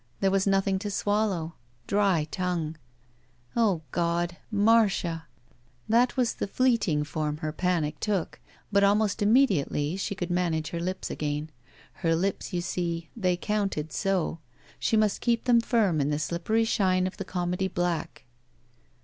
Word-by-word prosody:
There 195 - +2
was 195 0 +2
nothing 195 0 +2
to 205 +1 -4
swallow! 200 -5 0 0.3
Dry 195 -7 +2
tongue. 175 -4 -2 0.8
O 200 -9 +2
God! 170 0 0
Marda! 205 -6 +2 0.6
That 240 +4 +3
was 245 -3 +2
the - - -3
fleeting 220 -10 +2
form 150 0 -3
her 155 0 -3
panic 160 -3 -1
took, 200 -6 -2 0.3
but 200 0 +4
almost 205 +1 +2
immediately 195 - +2
she 200 +1 -3
could 175 -1 -4
manage 170 -3 0
her 170 - -4
lips 185 +2 -3
again. 150 +1 -3 0.5
Her 165 -2 +2
lips, 190 +4 -2
you 175 - -1
see, 170 -2 -3
they 185 -6 +1
counted 195 -7 -2
so! 190 -4 0 0.4
She 220 - +1
must 215 -2 +2
keep 235 -2 +1
them 240 -2 +4
firm 205 - +2
in 140 - 0
the 150 - 0
slippery 170 +8 0
shine 185 -5 +2
of 185 - -4
the - - -3
comedy 180 0 -2
black. 175 -6 -2
185 Hz, 150 wpm, -27 LUFS, 165-205 Hz, 0.8 s, but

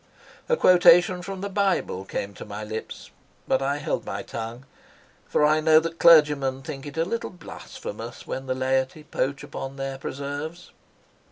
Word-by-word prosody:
A 485 - +3
quotation 180 - +6
from 190 +1 -6
the 200 - -2
Bible 190 - 0
came 100 +1 -4
to - - -9
my 105 +1 -7
lips, 110 +1 -7 0.4
but 130 - +2
I 140 +1 0
held - - -2
my - - -5
tongue, 115 +3 -7 0.6
for 150 - +3
I 155 +1 +4
know 155 0 +6
that 165 +1 -5
clergymen 150 -5 +5
think 135 +1 -7
it 145 +2 -9
a 165 - +2
little 230 +5 -3
blasphemous 460 - -9
when 135 0 -5
the 130 - -1
laity 130 +3 0
poach 140 -2 -2
upon 135 0 -6
their 135 -1 -5
preserves. 145 +6 -6
145 Hz, 165 wpm, -25 LUFS, 130-170 Hz, 0.6 s, quotation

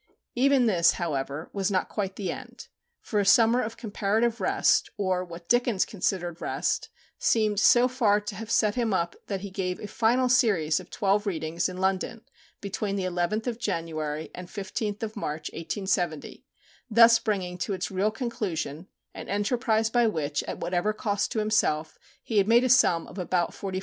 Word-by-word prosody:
Even 265 0 +3
this, 175 -6 +4
however, 145 -2 -3
was 195 -1 0
not 190 -2 0
quite 195 -3 -3
the 200 - -3
end; - - -10 0.3
for 210 - -1
a - - +3
summer 230 +4 +5
of 225 +1 -5
comparative 220 +1 -1
rest, - - +2
or 185 -3 0
what 170 -1 -10
Dickens 240 -5 +2
considered 180 -4 -2
rest, - - -1 0.3
seemed 215 -3 +2
so 240 +3 +6
far 230 -5 +2
to 210 +1 -6
have 220 +3 -7
set 215 -2 +2
him 230 -4 0
up 170 -1 -1
that 195 -2 -3
he 200 -1 -7
gave 180 -1 -3
a - - -6
final 235 +4 +2
series 205 - +3
of 185 - -12
twelve 205 0 0
readings 165 -1 -1
in 185 - -7
London 190 +4 -1 0.4
between 200 0 -3
the 195 - -2
11th 180 +4 -1
of 240 -2 -3
January 160 -6 -3
and 180 0 -8
15th 205 +2 -4
of 220 -1 -4
March, 155 -7 -4
1870, 175 -1 -3 0.4
thus 230 +1 +7
bringing 190 -5 -2
to 200 - -2
its 185 +2 -3
real 195 +3 +1
conclusion 190 - -4 0.3
an - - -9
enterprise 220 +2 +1
by 240 -1 +3
which, 150 -7 -1
at - - -4
whatever 180 +4 -1
cost 205 -1 -1
to - - -3
himself, 210 -8 0 0.2
he 220 -3 +1
had 195 - +2
made 235 +2 +5
a 255 - +1
sum 175 -9 +4
of 190 - -10
about 180 -1 0
£45,000. 190 -1 -4
200 Hz, 180 wpm, -27 LUFS, 180-225 Hz, 0.4 s, thus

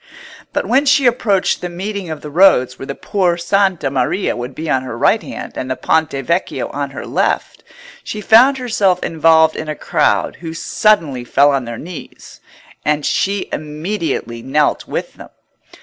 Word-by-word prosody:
But - - -1
when 275 +3 +2
she 280 -1 +4
approached 225 -6 +1
the 180 - -4
meeting 190 +1 -5
of 155 -2 -6
the 150 - -8
roads 145 -8 +4
where 135 - -7
the 140 - -5
Por' 180 -4 0
Santa 190 -4 +1
Maria 140 +9 0
would 120 +2 -6
be 160 - -5
on 135 -4 +1
her 125 -3 -6
right - - +3
hand - - -8
and 130 - -4
the 130 - -1
Ponte 160 +2 +1 0.2
Vecchio 170 -5 -1
on 140 0 -4
her 135 0 -8
left, - - -1 0.4
she 215 - -5
found 240 +6 +5
herself 205 -7 +1
involved 160 -1 +3
in 155 - -5
a 155 - -3
crowd - - 0
who 165 -1 -7
suddenly 165 - +1
fell 140 +4 +3
on 135 -3 -1
their 115 0 -6
knees; 175 +4 -10 0.4
and 150 -1 0
she 200 0 0
immediately 155 - -4
knelt 145 +4 0
with - - -4
them. - - -11
160 Hz, 175 wpm, -17 LUFS, 140-195 Hz, 0.4 s, found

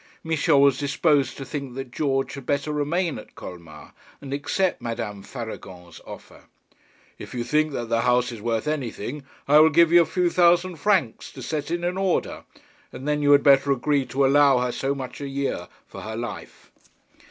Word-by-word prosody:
Michel 160 -3 +2
was 140 -2 +4
disposed 145 -1 +1
to 135 - -6
think 140 -3 -6
that 135 -2 -6
George 135 -1 -1
had 140 -2 -9
better 145 +1 -1
remain 160 +3 -1
at - - -15
Colmar, 85 -4 -11 0.3
and 135 -1 -7
accept 180 +6 -1
Madame 105 -3 -5
Faragon's 95 -8 -9
offer. - - -12 0.7
'If - - -9
you 120 - -2
think 155 +5 +1
that 120 -3 -4
the 115 0 +1
house 125 0 +2
is 115 -3 -9
worth 115 +3 -2
anything, 140 -2 -4 0.2
I 150 +2 +6
will 155 +1 +7
give 165 +2 +4
you 175 0 +7
a - - +2
few 175 +2 0
thousand 175 0 +3
francs 165 - 0
to - - -9
set 150 -2 -3
it 170 +1 -2
in 180 +1 -1
order; 190 -2 -1 0.5
and 135 - -8
then 150 0 0
you 145 0 +3
had 140 - +5
better 140 0 +5
agree 140 0 +1
to 135 +3 +1
allow 140 -1 +5
her 125 0 0
so 135 +3 -2
much 130 +1 -7
a 140 - -4
year 140 0 -3 0.2
for - - -10
her 110 0 -6
life.' 115 -2 -8
140 Hz, 190 wpm, -24 LUFS, 125-155 Hz, 0.7 s, will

